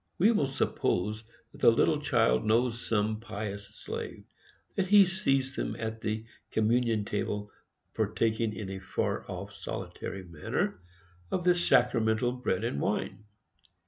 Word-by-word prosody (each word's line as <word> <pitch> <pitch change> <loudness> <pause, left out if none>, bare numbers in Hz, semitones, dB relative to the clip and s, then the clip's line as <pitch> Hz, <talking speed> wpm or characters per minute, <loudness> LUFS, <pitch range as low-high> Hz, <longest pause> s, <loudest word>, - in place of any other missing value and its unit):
We 205 +6 +5
will 205 -12 +2
suppose 110 -5 0 0.3
that - - -15
the - - +8
little 145 +6 +3
child 120 -6 +3
knows 115 +2 +2
some 110 0 +1
pious 100 -2 -5
slave; - - -6 0.5
that 190 - +1
he 205 0 +8
sees 135 -7 0
him - - -2
at 110 0 -4
the 110 0 -2 0.2
communion 115 -1 +2
table, 105 0 -2 0.4
partaking, 110 +1 +1
in 100 -3 -5
a 95 - -5
far 95 - -2
off, - - -6
solitary 95 -1 -6
manner, 85 0 -2 0.5
of 180 - -1
the 180 0 +5
sacramental 120 -8 +3
bread 120 -6 -1
and 70 -11 -1
wine. 105 - -2
110 Hz, 140 wpm, -30 LUFS, 105-130 Hz, 0.5 s, the